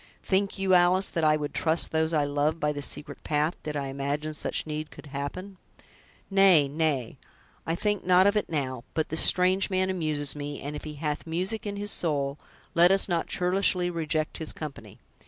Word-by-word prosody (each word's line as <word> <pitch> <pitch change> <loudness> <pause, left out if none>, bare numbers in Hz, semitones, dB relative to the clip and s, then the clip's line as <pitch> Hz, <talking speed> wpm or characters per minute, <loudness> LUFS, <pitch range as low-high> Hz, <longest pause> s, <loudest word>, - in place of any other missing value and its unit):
"Think 195 +1 0
you, 195 -1 +1
Alice, 180 +2 +4
that 165 - -2
I 155 0 +4
would 145 -1 -5
trust 160 +1 +2
those 160 0 +1
I 155 -3 +2
love 145 +3 0
by 150 -1 0
this 145 -1 -2
secret 150 - -7
path, 150 +2 0
did 150 -1 -4
I 140 -1 -3
imagine 140 +3 -3
such 150 - -1
need 155 0 -5
could - - -13
happen?" 145 +8 -6 0.7
"Nay, 190 -7 +5
nay, 140 -5 -2 0.5
I 165 - 0
think 205 +2 -1
not 185 +1 +5
of 200 +1 +3
it 210 - -1
now; 130 -6 -3
but 160 0 -1
this 160 - +1
strange 185 +2 +5
man 185 0 0
amuses 155 -5 -2
me; 145 0 -5
and 145 +1 -6
if 150 - -7
he 150 -1 -7
'hath 150 +1 -4
music 185 +7 -2
in 200 - -4
his 205 0 -2
soul', 145 -3 -1 0.3
let 170 +1 +6
us 195 +1 +3
not 170 -3 -1
churlishly 180 0 +1
reject 155 -2 -2
his 160 - -5
company." 150 -3 -9
160 Hz, 195 wpm, -27 LUFS, 145-185 Hz, 0.7 s, let